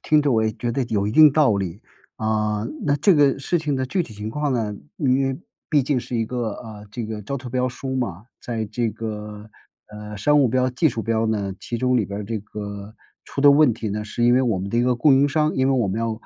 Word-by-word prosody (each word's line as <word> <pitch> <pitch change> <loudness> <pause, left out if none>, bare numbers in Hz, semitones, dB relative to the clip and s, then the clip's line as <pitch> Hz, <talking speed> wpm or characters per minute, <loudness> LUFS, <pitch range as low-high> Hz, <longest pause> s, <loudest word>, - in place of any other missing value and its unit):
听 155 -1 +3
着 145 -2 +2
我 110 -1 +3
也 110 - +1
觉 120 +2 -3
得 135 - 0
有 105 -3 -1
一 105 - -2
定 155 0 +8
道 135 -8 +3
理， 95 +2 -4 0.3
啊， 105 -1 -1 0.2
那 145 0 +3
这 195 +4 +4
个 145 -3 +3
事 170 +5 0
情 150 -3 -1
的 130 - -1
具 180 +7 0
体 110 - -10
情 105 +1 -5
况 150 +3 -1
呢， 110 -5 -1 0.2
因 135 0 +2
为 135 -1 -1 0.3
毕 150 -4 +3
竟 130 -1 0
是 120 - -5
一 115 - +1
个， 120 -2 -3
啊， 110 -3 -10
这 120 +1 -5
个 110 -1 -5
招 140 +7 -4
投 125 -1 -8
标 125 +1 0
书 130 +2 -5
嘛， 110 -6 -3 0.2
在 115 -2 -3
这 115 +3 -2
个， 105 -1 -7 0.4
呃， 105 0 -9
商 145 +8 +3
务 130 - +4
标 130 +2 +1
技 155 +6 +2
术 115 -4 -4
标 115 0 0
呢， 100 -3 -1
其 120 - -4
中 125 +2 +1
里 105 - 0
边 100 +1 -5
儿 - - -5
这 110 +1 -3
个 100 0 -8 0.3
出 140 - -4
的 145 - +8
问 140 -5 +5
题 110 -3 -4
呢， 105 +1 -3
是 120 +3 -2
因 120 - +5
为 125 - +4
我 115 -6 +1
们 100 +1 -5
的 120 - +1
一 - - +4
个 125 0 +2
供 140 +3 +4
应 140 +2 +4
商， 150 +2 +1
因 130 0 +2
为 135 - +3
我 120 -5 +1
们 95 +4 -2
要， 115 -1 -1
115 Hz, 285 characters per minute, -22 LUFS, 105-135 Hz, 0.4 s, 定